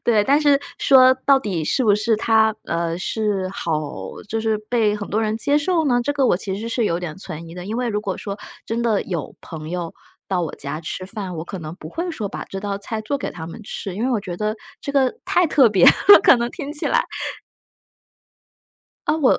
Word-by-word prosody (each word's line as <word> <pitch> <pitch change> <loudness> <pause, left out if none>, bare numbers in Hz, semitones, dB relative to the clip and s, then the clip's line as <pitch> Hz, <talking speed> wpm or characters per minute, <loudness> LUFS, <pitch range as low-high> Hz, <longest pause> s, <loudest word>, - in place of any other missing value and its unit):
对， 215 -3 +3
但 285 +5 +4
是 285 -2 +4 0.2
说 260 -1 +7
到 275 -1 +6
底 190 -10 -3
是 255 - +1
不 205 -2 +5
是 215 +1 +1
它 220 -1 +3
呃， 170 0 -1
是 200 -1 -1
好 160 -5 -1 0.5
就 225 +1 -1
是 220 -1 +1
被 220 -4 +2
很 205 - -6
多 215 +3 0
人 215 0 0
接 285 +6 +2
受 330 +1 +1
呢， 245 -2 +3
这 290 +4 -1
个 275 -2 +2
我 175 - +3
其 190 0 -4
实 230 +2 -5
是 230 -1 0
有 170 -3 0
点 175 -2 -6
存 165 -3 -8
疑 165 - -10
的。 180 - -7
因 220 - -3
为 245 0 -1
如 210 -2 -1
果 195 -3 -3
说， 200 0 -5 0.3
真 230 +1 -2
的 220 -4 +1
有 170 -7 -4
朋 155 -1 -8
友 175 -2 -4 0.4
到 185 -2 0
我 165 - -4
家 145 +3 -3
吃 185 +3 -5
饭， 195 -4 -5
我 160 - -5
可 190 +1 -7
能 155 0 -7
不 155 - -9
会 345 - -3
说 220 -10 -4
把 - - -6
这 195 - -6
道 200 -1 -3
菜 220 +2 -4
做 280 +7 -1
给 - - -4
他 160 -2 -8
们 195 +7 -9
吃， 195 -2 -5
因 215 - -4
为 260 - +1
我 225 -4 +1
觉 175 -2 -6
得 215 +2 -2 0.2
这 - - -4
个 270 +2 +2
太 360 -1 +3
特 270 -6 +5
别 195 -4 +4
了， 405 - +8
可 - - +7
能 235 0 -2
听 295 -1 -6
起 300 - +1
来。 - - +3 2.0
呃， 300 +2 +2
我- 275 - +4
215 Hz, 250 characters per minute, -21 LUFS, 180-250 Hz, 2.0 s, 了